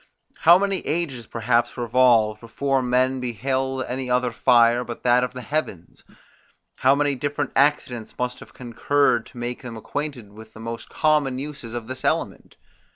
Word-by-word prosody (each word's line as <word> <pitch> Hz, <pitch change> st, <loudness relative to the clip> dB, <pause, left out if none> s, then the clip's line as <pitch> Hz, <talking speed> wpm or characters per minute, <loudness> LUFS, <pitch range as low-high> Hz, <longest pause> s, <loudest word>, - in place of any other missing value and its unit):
How 170 Hz, +2 st, +7 dB
many 195 Hz, -1 st, 0 dB
ages 145 Hz, -8 st, -3 dB
perhaps 120 Hz, +2 st, 0 dB
revolved, 120 Hz, -3 st, +3 dB
before 135 Hz, +4 st, -1 dB
men 130 Hz, +1 st, +1 dB
beheld 130 Hz, +2 st, -2 dB
any 130 Hz, 0 st, -4 dB
other 125 Hz, 0 st, +1 dB
fire 120 Hz, 0 st, +4 dB
but 120 Hz, -1 st, -8 dB
that 125 Hz, 0 st, +4 dB
of 125 Hz, -, -3 dB
the 125 Hz, -1 st, -7 dB
heavens? 145 Hz, -, -4 dB, 0.7 s
How 135 Hz, +2 st, +4 dB
many 145 Hz, 0 st, +1 dB
different 145 Hz, +1 st, -3 dB
accidents 135 Hz, -5 st, 0 dB
must 125 Hz, 0 st, -3 dB
have -, -, -13 dB
concurred 120 Hz, 0 st, 0 dB
to -, -, -16 dB
make 120 Hz, +1 st, -4 dB
them 120 Hz, -3 st, -8 dB
acquainted 130 Hz, -3 st, -5 dB
with 110 Hz, +1 st, -13 dB
the -, -, -13 dB
most 115 Hz, +1 st, -7 dB
common 150 Hz, -4 st, +1 dB
uses 135 Hz, -4 st, -7 dB
of 120 Hz, -2 st, -5 dB
this 130 Hz, +2 st, -7 dB
element? -, -, -2 dB
125 Hz, 160 wpm, -23 LUFS, 120-140 Hz, 0.7 s, How